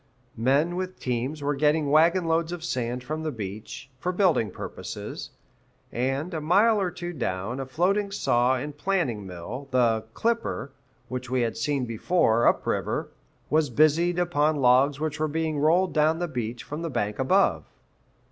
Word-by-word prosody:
Men 140 Hz, +9 st, +2 dB
with 185 Hz, 0 st, -4 dB
teams 130 Hz, +4 st, -2 dB
were 145 Hz, +1 st, +1 dB
getting 150 Hz, +1 st, +2 dB
wagon 170 Hz, +4 st, +4 dB
loads 165 Hz, 0 st, +1 dB
of 175 Hz, -2 st, -5 dB
sand 125 Hz, -5 st, -2 dB
from 155 Hz, +5 st, -4 dB
the 155 Hz, -1 st, -2 dB
beach, 110 Hz, +2 st, -7 dB
for 180 Hz, -, -1 dB
building 175 Hz, -, +2 dB
purposes. -, -, -7 dB, 0.6 s
And, 135 Hz, +8 st, -2 dB
a 160 Hz, -, -2 dB
mile 205 Hz, +7 st, +4 dB
or 185 Hz, -, 0 dB
two 175 Hz, 0 st, -6 dB
down, 115 Hz, -, -3 dB
a 135 Hz, -, -4 dB
floating 195 Hz, +8 st, +1 dB
saw 125 Hz, -9 st, +2 dB
and 145 Hz, +3 st, -5 dB
planing 145 Hz, -, -1 dB
mill 105 Hz, +10 st, -7 dB
the 115 Hz, -4 st, +2 dB
"Clipper," 230 Hz, -, -1 dB, 0.4 s
which 125 Hz, -1 st, -5 dB
we 130 Hz, 0 st, +1 dB
had 115 Hz, -1 st, -1 dB
seen 140 Hz, -4 st, -1 dB
before, 115 Hz, 0 st, +2 dB
up -, -, +2 dB
river -, -, -2 dB, 0.4 s
was 155 Hz, -1 st, +3 dB
busied 155 Hz, +6 st, +3 dB
upon 155 Hz, -3 st, +2 dB
logs 135 Hz, +1 st, +4 dB
which 155 Hz, -1 st, -3 dB
were 155 Hz, -, +1 dB
being 155 Hz, 0 st, -1 dB
rolled 175 Hz, +5 st, +3 dB
down 155 Hz, +1 st, +3 dB
the 175 Hz, +1 st, -2 dB
beach 120 Hz, -5 st, -4 dB
from 150 Hz, +2 st, -6 dB
the 165 Hz, -, -3 dB
bank 105 Hz, -5 st, -2 dB
above. 185 Hz, +10 st, +3 dB
150 Hz, 165 wpm, -26 LUFS, 125-170 Hz, 0.6 s, wagon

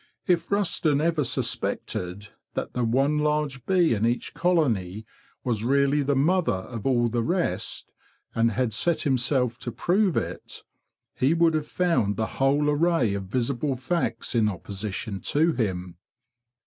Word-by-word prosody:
If 170 Hz, -3 st, +1 dB
Rusden 170 Hz, -7 st, +1 dB
ever 160 Hz, -1 st, +1 dB
suspected 100 Hz, -5 st, -2 dB, 0.3 s
that -, -, -3 dB
the 125 Hz, -, -1 dB
one 135 Hz, +6 st, +2 dB
large 150 Hz, -4 st, -1 dB
bee 180 Hz, -7 st, +3 dB
in 105 Hz, -1 st, -1 dB
each 120 Hz, +1 st, 0 dB
colony 120 Hz, -, 0 dB, 0.4 s
was 115 Hz, -4 st, -1 dB
really 140 Hz, +3 st, +2 dB
the 140 Hz, 0 st, +1 dB
mother 170 Hz, +6 st, +2 dB
of 110 Hz, +5 st, -5 dB
all 120 Hz, -3 st, +3 dB
the 120 Hz, +1 st, -1 dB
rest, 175 Hz, +8 st, -2 dB, 0.4 s
and 115 Hz, 0 st, +2 dB
had 120 Hz, 0 st, 0 dB
set 170 Hz, +9 st, +1 dB
himself 130 Hz, -2 st, +1 dB
to 125 Hz, -, -5 dB
prove 185 Hz, 0 st, +1 dB
it, -, -, -5 dB, 0.5 s
he 140 Hz, +6 st, +2 dB
would 165 Hz, -1 st, +3 dB
have 155 Hz, -1 st, -1 dB
found 165 Hz, -, +1 dB
the 110 Hz, -, 0 dB, 0.2 s
whole 140 Hz, +2 st, +3 dB
array 150 Hz, -7 st, +2 dB
of 100 Hz, -1 st, -4 dB
visible 130 Hz, +6 st, -1 dB
facts 130 Hz, -3 st, -2 dB
in 110 Hz, -3 st, +3 dB
opposition 100 Hz, +1 st, -5 dB
to 160 Hz, +3 st, +2 dB
him. 90 Hz, -, -3 dB
135 Hz, 150 wpm, -25 LUFS, 115-155 Hz, 0.5 s, bee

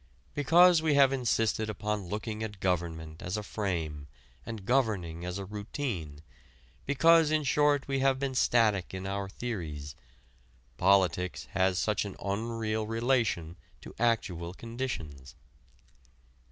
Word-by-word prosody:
Because 170 Hz, +4 st, +5 dB
we 155 Hz, -2 st, +2 dB
have 135 Hz, -1 st, +5 dB
insisted 115 Hz, -4 st, 0 dB
upon 105 Hz, -2 st, -3 dB
looking 110 Hz, +1 st, -4 dB
at 105 Hz, -3 st, -5 dB
government 80 Hz, -3 st, -2 dB
as 90 Hz, +4 st, -3 dB
a 105 Hz, -, -4 dB
frame 80 Hz, -9 st, -3 dB, 0.4 s
and 110 Hz, -4 st, -6 dB
governing 100 Hz, -10 st, 0 dB
as 90 Hz, +1 st, -4 dB
a 100 Hz, -, -5 dB
routine, 100 Hz, -, -5 dB, 0.6 s
because 165 Hz, +3 st, +5 dB
in 155 Hz, 0 st, +1 dB
short 145 Hz, 0 st, +2 dB
we 135 Hz, -1 st, 0 dB
have 135 Hz, 0 st, +3 dB
been 135 Hz, 0 st, -2 dB
static 110 Hz, -7 st, +2 dB
in 95 Hz, 0 st, -5 dB
our 100 Hz, 0 st, -3 dB
theories, 80 Hz, -11 st, -5 dB, 0.8 s
politics 90 Hz, -2 st, +2 dB
has 95 Hz, -1 st, +2 dB
such 105 Hz, +1 st, +1 dB
an 100 Hz, -2 st, -7 dB
unreal 110 Hz, +1 st, -2 dB
relation 115 Hz, -8 st, 0 dB, 0.2 s
to -, -, -11 dB
actual 95 Hz, -7 st, 0 dB
conditions. 95 Hz, -, -6 dB
105 Hz, 125 wpm, -30 LUFS, 90-125 Hz, 0.8 s, Because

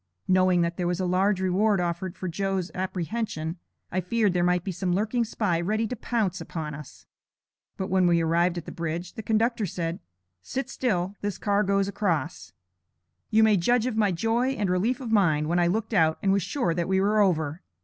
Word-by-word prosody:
Knowing 185 Hz, -1 st, +4 dB
that 170 Hz, 0 st, -2 dB
there 175 Hz, -, -1 dB
was 175 Hz, +1 st, -1 dB
a 185 Hz, -, 0 dB
large 185 Hz, +2 st, +2 dB
reward 190 Hz, +2 st, +2 dB
offered 175 Hz, +1 st, -2 dB
for 185 Hz, -, -4 dB
Joe's 190 Hz, +1 st, -2 dB
apprehension, 185 Hz, -2 st, -3 dB, 0.3 s
I 185 Hz, -, 0 dB
feared 205 Hz, +1 st, +1 dB
there 175 Hz, -1 st, +1 dB
might 180 Hz, 0 st, +2 dB
be 190 Hz, -, -3 dB
some 180 Hz, 0 st, -1 dB
lurking 220 Hz, +4 st, 0 dB
spy 205 Hz, -6 st, -1 dB
ready 215 Hz, +5 st, 0 dB
to 250 Hz, -, -4 dB
pounce 210 Hz, -5 st, -1 dB
upon 155 Hz, -3 st, -5 dB
us. 145 Hz, -1 st, -11 dB, 0.7 s
But 190 Hz, -, -4 dB
when 185 Hz, -1 st, +4 dB
we 170 Hz, -1 st, +4 dB
arrived 170 Hz, +2 st, +1 dB
at 170 Hz, -, -5 dB
the -, -, -7 dB
Bridge, 170 Hz, +1 st, -4 dB
the -, -, -6 dB
conductor 220 Hz, 0 st, +1 dB
said: 170 Hz, 0 st, -3 dB, 0.4 s
'Sit 265 Hz, -, -4 dB
still; 195 Hz, -9 st, -1 dB
this 205 Hz, -1 st, -3 dB
car 205 Hz, -1 st, +1 dB
goes 200 Hz, -1 st, +1 dB
across.' 165 Hz, -, -2 dB, 0.8 s
You 220 Hz, +1 st, +4 dB
may 215 Hz, -2 st, +5 dB
judge 240 Hz, +6 st, +2 dB
of 255 Hz, -3 st, -1 dB
my 210 Hz, -3 st, +2 dB
joy 225 Hz, +8 st, +1 dB
and 205 Hz, -7 st, -1 dB
relief 225 Hz, +9 st, 0 dB
of 235 Hz, -3 st, -5 dB
mind, 160 Hz, -8 st, +3 dB
when 175 Hz, +2 st, +1 dB
I 175 Hz, -, +3 dB
looked 220 Hz, +5 st, -1 dB
out 160 Hz, -5 st, +3 dB
and 195 Hz, -, +3 dB
was 200 Hz, -, +2 dB
sure 195 Hz, -1 st, -1 dB
that 170 Hz, 0 st, -1 dB
we 190 Hz, 0 st, +2 dB
were 210 Hz, +2 st, +3 dB
over! 160 Hz, -4 st, +1 dB
185 Hz, 205 wpm, -26 LUFS, 175-215 Hz, 0.8 s, may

